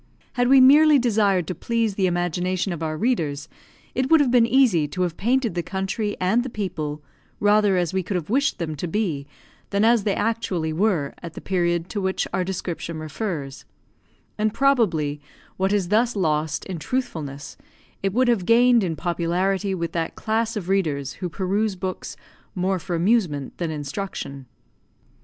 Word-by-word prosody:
Had 245 0 +1
we 270 +1 +7
merely 295 +3 +7
desired 210 -7 +2
to 185 - -3
please 230 +4 -1
the 190 -1 +1
imagination 175 +1 -1
of 165 - -7
our 155 -1 -2
readers, 155 - -1 0.5
it 260 +1 -1
would 325 - +6
have 275 -4 +2
been 240 -2 +5
easy 230 - +3
to 185 +4 -2
have 175 -2 -2
painted 240 +1 +1
the 175 - -1
country 195 +4 -3
and 190 +6 +2
the 260 - -5
people 155 -9 -4 0.4
rather 205 -2 +3
as 175 -2 0
we 190 - +1
could 185 +2 -4
have 170 -3 -2
wished 275 +5 +1
them 165 -3 -3
to 175 - -3
be, 160 -7 -2 0.4
than 200 +2 +2
as 230 -2 +4
they 200 -1 0
actually 190 -8 -1
were, 170 -5 0
at 170 -2 -8
the - - -6
period 175 -2 0
to 205 - -3
which 190 0 -1
our 185 0 +1
description 175 -3 -4
refers; 155 -3 -5 0.8
and, 215 0 0
probably, 175 - +2 0.4
what 190 +1 +1
is 200 -4 0
thus 230 +3 +2
lost 155 -4 0
in 185 -4 -5
truthfulness, 155 - -4 0.5
it 195 - 0
would 255 +5 +2
have 225 -7 +1
gained 240 0 +5
in 170 -3 -1
popularity 185 +4 -1
with 170 -2 -3
that 165 -1 -3
class 225 +1 -1
of 195 -5 -4
readers 155 -9 0
who 180 - -2
peruse 195 +4 -1
books 185 0 -5 0.4
more 185 0 0
for 175 +1 -4
amusement 170 - +1
than 170 -2 -1
instruction. 145 -3 -5
190 Hz, 175 wpm, -23 LUFS, 165-220 Hz, 0.8 s, we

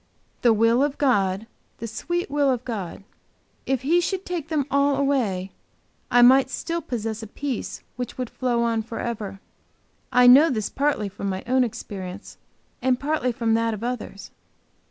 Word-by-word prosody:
The 240 - +5
will 230 +4 +4
of 290 0 -1
God, 200 -7 +1 0.3
the 230 - -6
sweet 345 - -3
will 290 -1 +2
of 250 -2 -1
God. 200 -5 -5 0.6
If 265 -2 0
He 340 +6 +3
should 380 +2 -2
take 345 -5 -4
them 305 -4 0
all 280 0 +3
away, 235 -10 0 0.6
I 245 0 +6
might 260 +1 +6
still 335 +4 -3
possess 225 -6 -4
a 220 - -7
peace 270 +3 -5
which 245 -2 -5
would 250 -2 -4
flow 240 -2 0
on 230 -1 +1
forever. 220 -3 -5 0.7
I 250 0 +5
know 275 +6 +8
this 215 -5 -2
partly 280 -7 0
from 200 0 -5
my 190 0 -3
own 255 +1 +3
experience 200 -4 -7 0.4
and 255 -1 +2
partly 285 -3 0
from 230 -1 0
that 230 0 +1
of 215 - -9
others. 240 -5 -5
245 Hz, 165 wpm, -24 LUFS, 220-275 Hz, 0.7 s, know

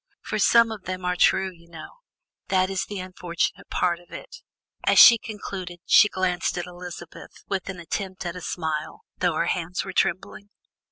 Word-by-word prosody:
For 215 - -3
some 230 +2 +5
of 210 -4 -8
them 185 -1 -5
are 180 0 0
true, 190 +1 +3
you 170 -1 -20
know; 165 - -11 0.5
that 185 0 +1
is 190 - -1
the 205 - -7
unfortunate 185 -2 -3
part 175 -1 0
of 175 - -22
it." - - -9 0.5
As - - +2
she 230 -2 +10
concluded, 190 -5 -7
she 205 - +6
glanced 185 -2 -1
at 175 - -3
Elizabeth 175 -1 -11
with 195 -1 -3
an 185 -2 -6
attempt 185 +2 -5
at 175 0 -4
a 180 - -7
smile, 160 -3 -4 0.2
though 175 -2 +1
her - - +1
hands 175 +1 -2
were - - -6
trembling. 195 +2 -1
180 Hz, 180 wpm, -24 LUFS, 175-190 Hz, 0.5 s, she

